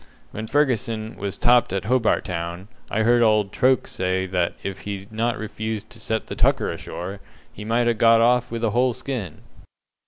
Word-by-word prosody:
When 110 +1 -6
Fergusson 115 -5 0
was 100 -1 -4
topped 120 -3 +4
at 95 0 -2
Hobart 120 0 +2
Town, 85 +1 -5 0.2
I 110 - 0
heard 120 +1 +4
old 110 -3 +3
Troke 130 +1 +2
say 95 0 -1
that 90 -2 -1
if 100 -1 -4
he'd 100 0 -6
not 115 +2 -1
refused 110 0 -5
to 115 - -13
set 110 +1 -2
the - - -6
tucker - - +2
ashore, 95 +3 -6 0.3
he 105 - -8
might 115 +3 +1
ha' 120 - +3
got 115 +1 +5
off 125 +1 +3
with 115 0 -4
a 110 - +2
whole 125 +2 +2
skin." 110 - -5
110 Hz, 185 wpm, -23 LUFS, 100-120 Hz, 0.3 s, got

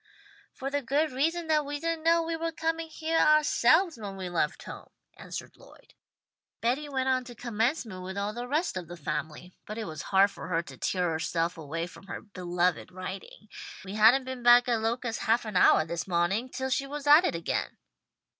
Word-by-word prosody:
"For 270 +1 -5
the 285 0 0
good 290 +5 0
reason 325 +6 0
that 310 -1 +2
we 290 0 -4
didn't 330 0 -2
know 335 0 +4
we 330 0 -2
were 330 0 -2
coming 325 0 -2
heah 320 +1 -1
ourselves 305 +1 +4
when 200 -2 -6
we 185 -1 -5
left 165 -4 -1
home," - - -10 0.3
answered - - -8
Lloyd. - - -19 0.7
"Betty 265 +6 -1
went 265 -2 -1
on 260 -1 +2
to 245 -1 -10
Commencement 225 - -2
with 190 +1 -6
all 200 +1 -2
the 240 +2 -5
rest 300 - 0
of 175 -3 -6
the 175 +1 -9
family, 155 +3 -5
but 215 - -6
it 225 - -3
was 155 -4 -6
hard 195 +1 +3
for - - -9
her 170 -2 0
to - - -11
tear 180 -3 -1
herself 165 +2 -1
away 165 +1 -4
from 185 +2 -14
her - - -5
beloved 180 -3 -2
writing. 185 +3 -8 0.4
We 190 - -7
hadn't 225 +5 +6
been 260 -1 -6
back 240 +1 +7
at 235 -2 +1
Locust 230 0 -2
half 230 +2 +1
an 215 - -5
houah 180 -3 +5
this 170 +2 -4
mawning 190 +7 0
till 265 0 -4
she 275 +2 0
was 290 0 -6
at 295 +4 +8
it 360 - 0
again." 170 - -3
235 Hz, 200 wpm, -28 LUFS, 185-290 Hz, 0.7 s, at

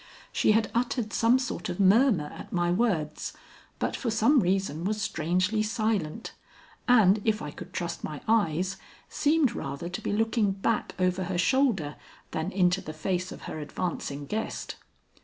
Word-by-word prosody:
She 215 - +3
had 220 -1 +1
uttered 235 -2 -1
some 230 +3 +4
sort 255 -9 -3
of 175 - -4
murmur 200 - +4
at - - -10
my 175 -1 +1
words, 175 -7 0 0.4
but - - -1
for 245 - -2
some 225 +6 +4
reason 185 - 0
was 210 +3 -1
strangely 185 +3 0
silent, 215 -4 -1 0.5
and, 215 -5 +5
if 220 -1 +1
I - - -5
could - - -10
trust - - -4
my - - -5
eyes, 190 -4 +1 0.3
seemed 295 -4 +2
rather 140 - -5
to 185 +4 -5
be - - -2
looking 220 -1 +1
back 200 +1 -1
over 185 0 +1
her 180 0 -2
shoulder 190 - +2 0.3
than 160 +4 -2
into 185 -1 +2
the 155 -4 -7
face 180 +3 -2
of - - -9
her - - -6
advancing 145 -2 -4
guest. 220 +9 -4
195 Hz, 160 wpm, -28 LUFS, 175-225 Hz, 0.5 s, and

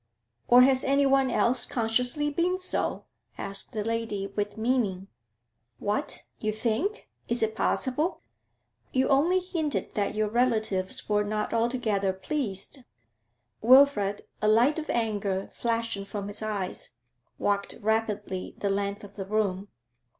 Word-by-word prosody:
'Or 245 +1 +8
has 260 0 +4
anyone 275 -1 +3
else 245 0 +2
consciously 250 +6 +1
been 350 +4 +1
so?' 370 0 -1 0.3
asked 195 0 -5
the 215 -2 -2
lady, 225 -3 -2
with 205 0 -2
meaning. 220 -5 0 0.7
'What? 210 - -2 0.2
You 215 - -1
think? 235 - -2 0.2
Is 235 0 0
it 220 0 0
possible?' 285 +9 0 0.7
'You 260 0 +1
only 310 +7 +4
hinted 335 -5 -3
that 205 0 -1
your 215 0 +1
relatives 220 -5 +1
were 210 0 +2
not 210 0 -2
altogether 225 -5 +1
pleased.' 200 +2 -3 0.8
Wilfrid, 230 -5 +5 0.2
a 210 - +2
light 240 +9 +4
of 310 - -7
anger 205 -4 -1
flashing 230 -3 -1
from 200 0 -5
his 205 - -6
eyes, 205 -9 -4 0.4
walked 200 -1 -1
rapidly 210 -3 -2
the 200 - -1
length 200 +1 -2
of 200 -1 -11
the 195 - -4
room. 200 -2 0
220 Hz, 130 wpm, -27 LUFS, 205-255 Hz, 0.8 s, Or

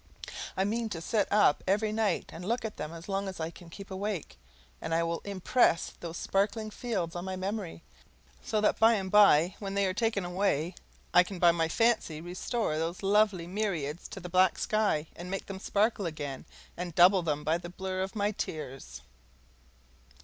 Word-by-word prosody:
I 190 - +3
mean 225 +3 -1
to 170 - -4
sit 205 +5 0
up 205 -8 +4
every 210 +3 +2
night 215 -1 0
and 165 - -8
look 230 +4 -1
at 215 - -5
them 155 - -5
as 165 0 -10
long 195 0 -1
as 190 -2 -6
I 160 +1 -3
can 170 -1 -14
keep 195 +3 -10
awake; 190 - -4 0.4
and 165 - -1
I 165 - +2
will 165 0 -1
impress 200 -1 +2
those 170 0 -7
sparkling 215 +2 0
fields 200 -7 -3
on 175 - -4
my 190 0 -4
memory, 190 -3 -4 0.6
so 215 - 0
that 210 - +2
by 225 +1 +6
and 190 -2 -3
by 185 -4 +6
when 195 -1 -4
they 200 0 +2
are 185 - 0
taken 210 -2 0
away 175 -2 0 0.4
I 180 - +8
can 185 +1 -4
by 175 -1 +6
my 165 -1 0
fancy 220 -5 +1
restore 175 +1 -2
those 170 +4 -3
lovely 200 -3 +3
myriads 175 -5 -3
to - - -8
the 180 - -7
black 185 +1 +3
sky 210 -8 +1
and 175 +1 -8
make 195 +1 -3
them 195 -1 -7
sparkle 205 -1 +1
again, 145 -4 -5 0.3
and 175 -2 -5
double 185 +2 +7
them 150 -3 -2
by 160 +3 +1
the 175 0 -8
blur 185 +1 -4
of 190 +2 -4
my 205 0 +1
tears. 145 -9 -6
190 Hz, 195 wpm, -30 LUFS, 170-205 Hz, 0.6 s, I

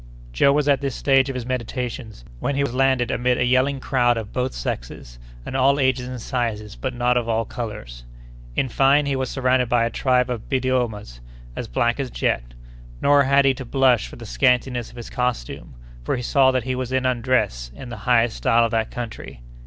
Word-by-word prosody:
Joe 140 - +4
was 145 0 +1
at 140 -1 +3
this 140 -3 -2
stage 135 -1 +3
of 135 - -4
his 125 -2 -4
meditations, 120 - -5
when 140 - -1
he 140 - +1
was 140 - -2
landed 130 -2 +2
amid 125 +1 +1
a 125 - +1
yelling 130 +2 +2
crowd 120 -2 +1
of 110 -2 -6
both 125 +1 -1
sexes, - - -6 0.3
and - - -6
all 135 +2 +3
ages 130 -2 +1
and 125 -1 -6
sizes, 110 -4 -3
but 130 -2 -4
not 125 0 +2
of 120 -1 -1
all 115 0 0
colors. 105 - -7 0.5
In 135 - +1
fine, 140 +4 +3
he 140 -1 0
was 130 -1 -2
surrounded 130 -2 +1
by 120 -1 +3
a 115 - -2
tribe 125 0 +1
of 115 -3 -5
Biddiomahs 125 - -1 0.4
as - - -5
black 120 - 0
as 135 -2 -2
jet. - - -2 0.4
Nor 140 -1 +4
had 140 +1 +4
he 135 - +4
to 130 - -7
blush 130 - +2
for - - -11
the - - -10
scantiness 125 - +1
of - - -16
his 120 - -8
costume, 125 - -3 0.3
for - - -1
he 125 - -4
saw 135 +1 +4
that 130 -2 0
he 130 - -2
was 130 -1 -4
in 130 0 0
"undress" 120 - 0
in 130 - -9
the 120 - -7
highest 120 -2 +3
style 120 -2 +3
of 115 - -2
that 110 -1 0
country. 115 - -7
125 Hz, 210 wpm, -22 LUFS, 115-130 Hz, 0.5 s, Joe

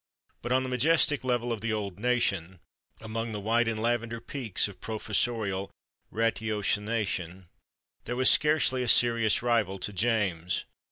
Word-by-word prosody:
But 120 - -5
on 130 +1 +3
the 130 - -4
majestic 145 +3 +3
level 120 -2 0
of 110 - -6
the 115 0 -2
old 100 -3 -4
Nation, 100 -7 0 0.4
among 110 +1 -4
the 105 - -4
white 115 +3 +1
and 110 -1 -1
lavender 115 0 -1
peaks 120 -5 -2
of 95 -3 -13
professorial 110 -2 -2 0.4
ratiocination, 105 -5 -2 0.6
there 120 - -3
was 130 0 +4
scarcely 150 -4 +3
a 125 - -2
serious 115 -2 +4
rival 115 -5 +1
to 105 +2 -5
James. 95 -6 0
115 Hz, 145 wpm, -28 LUFS, 100-120 Hz, 0.6 s, was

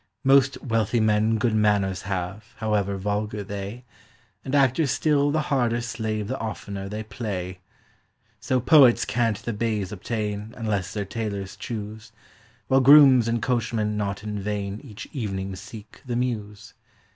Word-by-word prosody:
Most 135 0 +4
wealthy 115 -1 +1
men 110 +1 +2
good 115 0 +1
manors 105 -3 +2
have, 95 +4 -4
however 105 -3 -1
vulgar 105 +1 -2
they; 100 +4 -6 0.6
And 135 - -2
actors 140 +2 +3
still 145 +1 +2
the 155 +2 +1
harder 120 -5 +1
slave 110 -3 -3
the 130 +3 -3
oftener 100 -3 -5
they 105 +2 -4
play. 100 -4 -5 0.8
So 130 - 0
poets 125 -3 +6
can't 115 -3 0
the 120 - -5
baize 105 -3 -2
obtain, 105 +1 -4
unless 100 -5 -2
their 105 -1 -3
tailors 100 -2 -4
choose; 110 -1 -7 0.6
While 135 0 +4
grooms 135 -3 +8
and 115 -1 -1
coachmen 115 -4 0
not 100 -1 -3
in 105 -1 -4
vain 100 0 -3
each 110 -7 -9
evening 95 -6 -3
seek 105 +3 -11
the 125 -3 -4
Mews. 110 -5 -3
110 Hz, 145 wpm, -25 LUFS, 100-120 Hz, 0.8 s, grooms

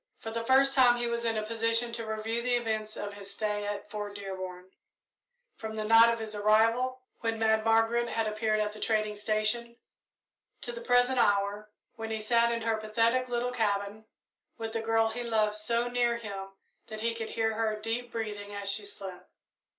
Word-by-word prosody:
For 225 - -7
the 230 0 -3
first 270 +3 +5
time 250 -3 +6
he 240 - -1
was 235 0 -2
in 225 -1 0
a 215 - -2
position 230 +1 +1
to 230 -1 -4
review 220 +2 -2
the 245 0 +1
events 220 -2 -2
of 205 0 -5
his 200 -1 -9
stay 210 -1 -2
at 205 0 -5
Fort 205 -1 -5
Dearborn, 185 -2 -7 0.9
from 220 0 -6
the 215 - -2
night 225 +1 +7
of 230 - -1
his 220 -1 -5
arrival, 230 +5 +2 0.2
when 225 -1 -1
Mad 220 -1 +2
Margaret 225 +1 +3
had 225 -1 0
appeared 215 0 0
at 210 0 -1
the 215 - -10
trading 215 -1 0
station, 215 +3 0 0.9
to 240 - -4
the 235 0 -7
present 245 +1 +3
hour, 205 -1 +1 0.3
when 225 0 -5
he 220 0 -2
sat 235 +2 +3
in 230 -1 -2
her 225 -1 +1
pathetic 230 +4 +1
little 245 +1 -1
cabin, 210 -2 -1 0.5
with 225 -1 -5
the 225 - -1
girl 225 0 +2
he 235 +2 -4
loved 215 -3 +1
so 230 +3 0
near 240 -1 +1
him 200 -4 -6 0.4
that 215 0 -7
he 230 +1 0
could 225 -1 -5
hear 220 -1 0
her 215 -1 -1
deep 230 +2 -3
breathing 205 -2 -5
as 200 0 0
she 205 +1 -1
slept. 190 -3 -9
225 Hz, 195 wpm, -29 LUFS, 215-235 Hz, 0.9 s, night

